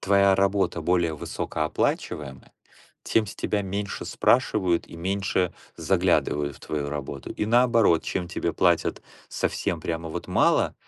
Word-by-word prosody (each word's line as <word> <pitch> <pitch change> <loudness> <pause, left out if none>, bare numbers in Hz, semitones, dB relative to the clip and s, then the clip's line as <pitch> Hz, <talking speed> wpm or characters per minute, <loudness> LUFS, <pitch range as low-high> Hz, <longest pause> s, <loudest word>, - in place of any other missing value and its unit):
твоя 100 0 +4
работа 95 -3 +1
более 85 -1 +1
высокооплачиваемая, 75 -3 -3 0.5
тем 110 -1 +1
с - - -8
тебя 105 - -1
меньше 100 +1 -4
спрашивают 95 -9 +2
и - - -11
меньше 95 0 -1 0.2
заглядывают 70 -2 +1
в - - -20
твою 75 -2 -3
работу. 70 -2 -6
И, - - -2
наоборот, 115 -7 +4
чем 90 -2 -3
тебе 85 -1 -2
платят 85 0 +1 0.3
совсем - - -2
прямо 80 0 -3
вот 80 - -6
мало, - - +3
90 Hz, 130 wpm, -25 LUFS, 80-100 Hz, 0.5 s, твоя